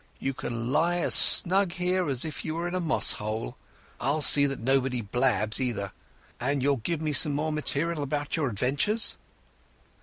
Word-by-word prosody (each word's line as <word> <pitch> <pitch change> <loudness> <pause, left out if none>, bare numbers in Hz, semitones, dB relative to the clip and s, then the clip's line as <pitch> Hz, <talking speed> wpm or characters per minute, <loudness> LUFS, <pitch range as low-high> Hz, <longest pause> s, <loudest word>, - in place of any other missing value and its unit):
"You 135 - -3
can 120 -1 -5
lie 170 +4 +1
as 175 - +2
snug 190 0 +6
here 180 -1 -1
as 130 0 -1
if 155 - -7
you 160 -1 -5
were 170 +1 -3
in 175 - -6
a 185 - -1
moss 165 -3 +1
hole. 105 - -5 0.4
I'll 145 +4 -1
see 140 +1 +5
that 135 -1 -5
nobody 130 +1 0
blabs, 110 +1 0
either. 110 -6 -3 0.5
And 140 +1 -2
you'll 140 0 +1
give 155 +8 -4
me 155 -1 -2
some 145 +1 +4
more 155 +2 -2
material 155 +1 -1
about 145 +1 -3
your 145 -5 -1
adventures?" 145 - -1
145 Hz, 180 wpm, -26 LUFS, 125-165 Hz, 0.5 s, snug